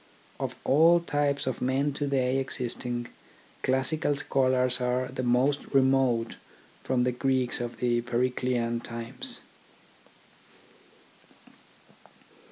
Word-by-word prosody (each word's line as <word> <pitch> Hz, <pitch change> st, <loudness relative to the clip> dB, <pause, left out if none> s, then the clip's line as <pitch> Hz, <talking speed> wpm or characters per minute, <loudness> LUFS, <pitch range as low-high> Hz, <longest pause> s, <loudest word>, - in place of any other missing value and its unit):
Of -, -, -3 dB
all 165 Hz, +5 st, +5 dB
types 145 Hz, -4 st, 0 dB
of 130 Hz, -, -3 dB
men 135 Hz, +3 st, +1 dB
to 145 Hz, +1 st, -2 dB
day 135 Hz, -1 st, +1 dB
existing, 120 Hz, -2 st, -3 dB, 0.5 s
classical 145 Hz, +4 st, +1 dB
scholars 130 Hz, -3 st, +1 dB
are 125 Hz, +1 st, 0 dB
the -, -, -4 dB
most 130 Hz, +4 st, +2 dB
remote 130 Hz, -4 st, +2 dB, 0.5 s
from 125 Hz, -1 st, +1 dB
the 125 Hz, -, +2 dB
Greeks 130 Hz, -1 st, 0 dB
of 120 Hz, 0 st, -5 dB
the 120 Hz, -1 st, +1 dB
Periclean 120 Hz, -1 st, -1 dB
times. 115 Hz, +2 st, -4 dB
130 Hz, 100 wpm, -28 LUFS, 125-135 Hz, 0.5 s, all